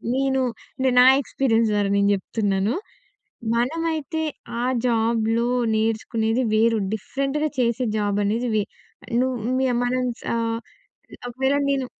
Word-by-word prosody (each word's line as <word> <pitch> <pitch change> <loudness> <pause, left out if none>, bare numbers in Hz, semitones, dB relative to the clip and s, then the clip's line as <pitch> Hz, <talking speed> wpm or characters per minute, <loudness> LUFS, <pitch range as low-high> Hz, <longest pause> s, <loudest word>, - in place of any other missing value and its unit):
నేను 265 0 +1 0.6
నా 250 - +8 0.2
ఎక్స్‌పీరియన్స్ 230 -4 +1
ద్వారా 205 -1 +1
నేను 200 0 +3
జెప్తున్నాను. 200 +2 -1 0.8
మనమైతే 320 +4 -1 0.4
ఆ - - 0 0.2
జాబ్‌లో 230 0 +1 0.3
నేర్చుకునేది 225 +2 0
వేరు. 225 +1 +3
డిఫరెంట్‌గా 275 +7 -2
చేసే 245 +1 +1
జాబనేది 205 +3 0
వే 210 - +2 0.6
నువ్వు 260 0 0 0.2
మియ 260 -1 +2
మనం 255 +1 0 0.2
సా - - -2 0.9
ఒకవేళ 265 +3 0
నేను 275 -2 0
235 Hz, 105 wpm, -23 LUFS, 220-265 Hz, 0.9 s, నా